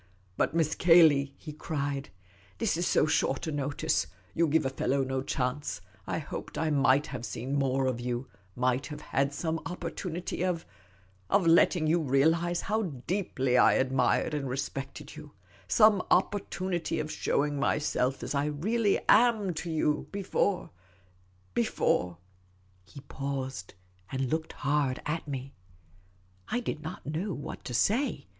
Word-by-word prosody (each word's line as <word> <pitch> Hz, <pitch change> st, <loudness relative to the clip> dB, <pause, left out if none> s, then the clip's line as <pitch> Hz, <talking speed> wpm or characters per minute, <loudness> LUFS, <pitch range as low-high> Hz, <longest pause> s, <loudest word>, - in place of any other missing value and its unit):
" -, -, -34 dB
But, 150 Hz, -, 0 dB
Miss 155 Hz, -2 st, +2 dB
Cayley," 155 Hz, -5 st, +5 dB
he 150 Hz, -, -9 dB
cried, 140 Hz, -4 st, -3 dB, 0.2 s
" 95 Hz, -1 st, -29 dB
this -, -, +1 dB
is 175 Hz, +1 st, 0 dB
so -, -, +3 dB
short 135 Hz, -3 st, +1 dB
a 160 Hz, -, -2 dB
notice; 145 Hz, -, 0 dB, 0.3 s
you 170 Hz, 0 st, +2 dB
give 155 Hz, -1 st, +2 dB
a 135 Hz, -, 0 dB
fellow 135 Hz, 0 st, 0 dB
no 130 Hz, 0 st, -2 dB
chance; 130 Hz, +2 st, -2 dB, 0.3 s
I -, -, -1 dB
hoped -, -, -6 dB
I 160 Hz, -1 st, 0 dB
might 140 Hz, 0 st, +4 dB
have 130 Hz, -5 st, -6 dB
seen 125 Hz, +3 st, -4 dB
more 135 Hz, -1 st, +1 dB
of 130 Hz, -2 st, -1 dB
you 120 Hz, +1 st, -3 dB
— 95 Hz, -1 st, -33 dB
might 130 Hz, +2 st, +1 dB
have 150 Hz, 0 st, -7 dB
had 140 Hz, -1 st, 0 dB
son;i2 160 Hz, +3 st, -3 dB
opportunity 175 Hz, 0 st, -4 dB
of 175 Hz, -3 st, -1 dB, 0.3 s
— 95 Hz, 0 st, -33 dB
of 200 Hz, -, +3 dB
letting 165 Hz, 0 st, +5 dB
you 165 Hz, +2 st, +3 dB
realise 160 Hz, +5 st, +2 dB
how 215 Hz, +2 st, 0 dB, 0.2 s
deeply 135 Hz, -9 st, +1 dB
I -, -, +6 dB
admired 130 Hz, +3 st, +2 dB
and 140 Hz, -3 st, -2 dB
respected 135 Hz, +3 st, -5 dB
you 150 Hz, -1 st, -11 dB, 0.2 s
— -, -, -27 dB
some 215 Hz, -4 st, +5 dB
opportunity 185 Hz, -2 st, 0 dB
of 155 Hz, 0 st, -3 dB
showing 145 Hz, 0 st, 0 dB
myself 135 Hz, -2 st, 0 dB
as -, -, -3 dB
I 140 Hz, 0 st, +1 dB
really 200 Hz, +9 st, +1 dB
am 220 Hz, -5 st, +4 dB
to 165 Hz, +2 st, -5 dB
you 150 Hz, -2 st, 0 dB
— -, -, -30 dB
before 200 Hz, -1 st, -1 dB, 0.4 s
— 95 Hz, 0 st, -34 dB
before 90 Hz, -6 st, +1 dB, 0.3 s
" 95 Hz, 0 st, -34 dB
he 140 Hz, -, -10 dB
paused, 135 Hz, -8 st, -5 dB, 0.4 s
and 130 Hz, -1 st, -2 dB
looked 160 Hz, 0 st, -2 dB
hard 140 Hz, -1 st, 0 dB
at 155 Hz, +1 st, -3 dB
me. 135 Hz, -1 st, -5 dB, 0.9 s
I 245 Hz, -, 0 dB
did 195 Hz, -10 st, -4 dB
not 155 Hz, -, -7 dB
know 165 Hz, +6 st, -2 dB
what 145 Hz, -, -7 dB
to 125 Hz, -, -4 dB
say. 220 Hz, -, +1 dB
145 Hz, 165 wpm, -29 LUFS, 130-165 Hz, 0.9 s, I